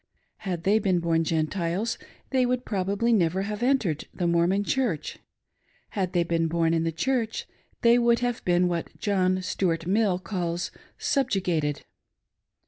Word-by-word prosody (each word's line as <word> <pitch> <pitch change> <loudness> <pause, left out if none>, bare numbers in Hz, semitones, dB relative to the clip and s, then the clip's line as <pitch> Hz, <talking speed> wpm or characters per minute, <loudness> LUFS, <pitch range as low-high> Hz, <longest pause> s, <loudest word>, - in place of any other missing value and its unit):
Had 180 -5 -4
they 205 +4 +4
been 190 -4 +1
born 165 -1 +1
Gentiles, 170 +6 -1 0.3
they 260 -1 +3
would 250 0 0
probably 200 +4 0
never 185 -2 +2
have 210 +2 -4
entered 240 - +1
the 180 - -3
Mormon 170 +4 +2
Church; 230 - -1 0.7
had 190 -3 -2
they 175 -2 +3
been 165 -1 0
born 165 0 +1
in 165 -1 +1
the 165 - 0
Church 230 +6 -1 0.4
they 235 +1 +6
would 235 0 +4
have 245 -1 -2
been 180 0 +3
what 170 -2 -3
John 185 -2 +1
Stuart 165 -3 -1
Mill 195 0 +2
calls 175 -2 -3 0.2
" - - -38
subju 260 -9 +1
gated." 155 -5 -1
185 Hz, 155 wpm, -26 LUFS, 170-220 Hz, 0.7 s, they